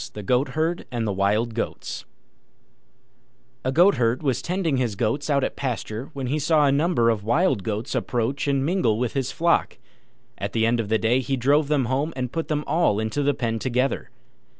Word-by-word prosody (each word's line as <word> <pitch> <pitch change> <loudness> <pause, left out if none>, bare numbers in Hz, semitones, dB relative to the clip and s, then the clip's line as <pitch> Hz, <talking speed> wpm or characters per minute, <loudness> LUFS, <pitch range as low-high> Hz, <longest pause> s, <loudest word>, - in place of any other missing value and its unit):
THE 105 - -6
GOATHERD 145 - 0
AND 120 -2 -2
THE 105 - -1
WILD 105 +4 +1
GOATS 115 - -4 1.6
A 130 - 0
Goatherd 130 -7 +3
was 130 -3 0
tending 175 -4 -1
his 120 -5 -1
goats 120 +9 -1
out 140 -2 +2
at - - -2
pasture 120 -2 -4
when 135 -2 -4
he 145 +5 -1
saw 150 0 +3
a 140 - +4
number 140 -5 +2
of 105 -3 -3
Wild 130 - +2
Goats 105 +3 -3
approach 125 +4 -1
and 140 -1 +1
mingle 150 - +1
with 120 0 -1
his 135 -1 -1
flock. 170 +1 +1 0.6
At - - -4
the 110 -1 +2
end 115 +1 +2
of 110 -3 -2
the 110 - +3
day 115 +4 +2
he 135 +1 -1
drove 140 +4 +3
them 145 -3 +1
home 135 +6 -1
and 125 -2 -3
put 165 +3 -3
them 150 -1 -1
all 160 -11 +2
into 110 +6 -1
the 145 -1 +1
pen 115 -2 -2
together. 130 +2 -1
130 Hz, 195 wpm, -24 LUFS, 115-145 Hz, 1.6 s, a